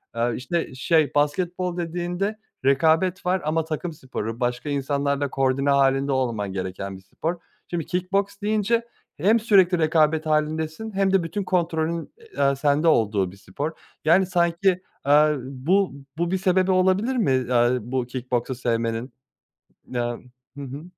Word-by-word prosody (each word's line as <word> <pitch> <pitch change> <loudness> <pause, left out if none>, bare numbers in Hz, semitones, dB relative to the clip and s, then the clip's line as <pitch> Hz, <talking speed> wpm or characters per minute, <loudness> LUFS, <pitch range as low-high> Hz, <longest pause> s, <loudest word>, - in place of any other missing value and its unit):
Eee, 120 +1 +1
işte 165 +1 -3
şey 155 +2 +2
basketbol 175 +4 0
dediğinde 175 +5 -2 0.3
rekabet 165 +7 +3
var 185 +1 +1
ama 160 +1 +1
takım 160 +1 -4
sporu, 115 -5 -5
başka 125 +3 -2
insanlarla 140 0 0
koordine 135 +1 +1
hâlinde 140 0 +3
olman 115 -7 -1
gereken 95 +1 -5
bir 95 - -15
spor. 165 - -4 0.3
Şimdi 170 -3 -3
kick 180 +1 -3
boks 200 +1 0
deyince 215 +3 +1 0.3
hem 210 +9 +3
sürekli 190 -5 +4
rekabet 155 0 +2
hâlindesin 155 +6 -1
hem 195 -1 +1
de 190 -3 +4
bütün 200 +4 -3
kontrolün, 170 -2 -1 0.2
eee, 140 0 +3
sende 145 +3 +2
olduğu 105 - +2
bir 100 - -15
spor. 120 - -4 0.3
Yani, 175 +4 +5
sanki, 175 +1 +1 0.4
eee, 150 +1 +5
bu 145 +8 0 0.2
bu 170 +1 -1
bir 190 - +2
sebebi 185 0 +2
olabilir 190 +7 +2
mi, 210 - +2
eee, 125 -1 +2
bu 125 +2 -2
kick 125 0 -7
boksu 125 +1 0
sevmenin? 115 0 -2 0.8
Eee, 120 - -1 0.6
hı 140 - -6
hı. 140 +3 -7
155 Hz, 150 wpm, -24 LUFS, 130-180 Hz, 0.8 s, Yani